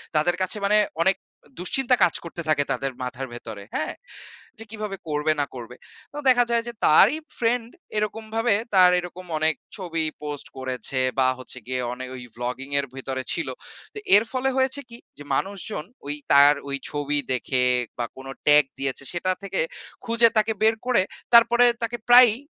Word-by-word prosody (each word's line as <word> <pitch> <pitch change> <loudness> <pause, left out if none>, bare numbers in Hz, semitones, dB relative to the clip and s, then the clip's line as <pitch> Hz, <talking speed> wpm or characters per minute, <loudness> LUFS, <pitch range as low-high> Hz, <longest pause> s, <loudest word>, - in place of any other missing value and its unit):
তাদের 165 +4 +3
কাছে 185 +3 -1
মানে 210 +1 +4 0.3
অনেক 190 +1 +3 0.3
অ - - -26
দুশ্চিন্তা 250 +8 +2
কাজ 170 - +3
করতে 170 0 -7
থাকে 145 -2 +3
তাদের 135 0 -1
মাথার 130 +1 -5
ভেতরে, 110 -4 -8
হ্যাঁ? 155 - -2 0.6
যে 225 - -7
কীভাবে 210 -2 -5
করবে 150 0 0
না 145 - +1
করবে? 125 0 -9 0.4
তো - - -8
দেখা 245 -1 +6
যায় 235 -1 +2
যে 240 - -5
তারই 205 - +6 0.2
ফ্রেন্ড 230 0 0 0.3
এরকমভাবে 220 +2 -1 0.2
তার 185 -2 +7
এরকম 180 +1 -8
অনেক 155 -1 +1 0.2
ছবি 165 -4 -2 0.2
পোস্ট 150 -1 -5
করেছে 130 0 -3 0.2
বা 130 - +4
হচ্ছে 130 - -9
গিয়ে 130 0 -2
অনে 130 +1 -7
ওই 125 - -8
ব্লগিং 125 +3 -5
এর 140 - -1
ভিতরে 130 0 -4
ছিল। - - -3 0.5
তো - - -9 0.2
এর 205 - +7
ফলে 260 +1 0
হয়েছে 265 +1 +1
কী? 235 - -10 0.2
যে 145 - -9
মানুষজন 195 -3 -3 0.2
ওই 145 - -2 0.2
তার 140 +1 +8 0.2
ওই 140 - -2
ছবি 145 0 -2 0.2
দেখে 125 +1 0 0.3
বা 120 - -1
কোন 135 0 -10 0.2
ট্যাগ 150 0 +7 0.2
দিয়েছে 135 0 -2
সেটা 185 +2 0
থেকে 195 - -2 0.5
খুঁজে 230 0 +5
তাকে 215 +1 +3
বের 220 +1 +4
করে 250 -5 +3 0.3
তারপরে 235 +1 +7 0.2
তাকে 230 +1 -2
প্রায়ই 245 -2 +8
175 Hz, 175 wpm, -24 LUFS, 135-225 Hz, 0.6 s, তার